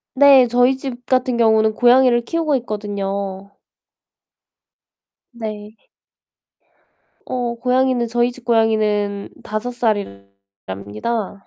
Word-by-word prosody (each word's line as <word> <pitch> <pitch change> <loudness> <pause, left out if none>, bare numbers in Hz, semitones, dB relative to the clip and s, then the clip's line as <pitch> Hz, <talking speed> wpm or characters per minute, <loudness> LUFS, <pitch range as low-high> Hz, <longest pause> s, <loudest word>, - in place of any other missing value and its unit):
네 270 -3 +6
저희 245 +2 +3
집 250 -2 -7
같은 255 -1 +1
경우는 220 -1 +3
고양이를 245 0 +4
키우고 315 +2 -1
있거든요. 200 -3 -5 1.8
네. 215 -2 -7 1.5
어 245 -2 -3
고양이는 255 0 +1
저희 240 +1 0
집 245 -1 -13
고양이는 215 -3 0
5 215 +3 -4
살이랍니다. 100 - -5
225 Hz, 200 characters per minute, -19 LUFS, 205-245 Hz, 1.8 s, 네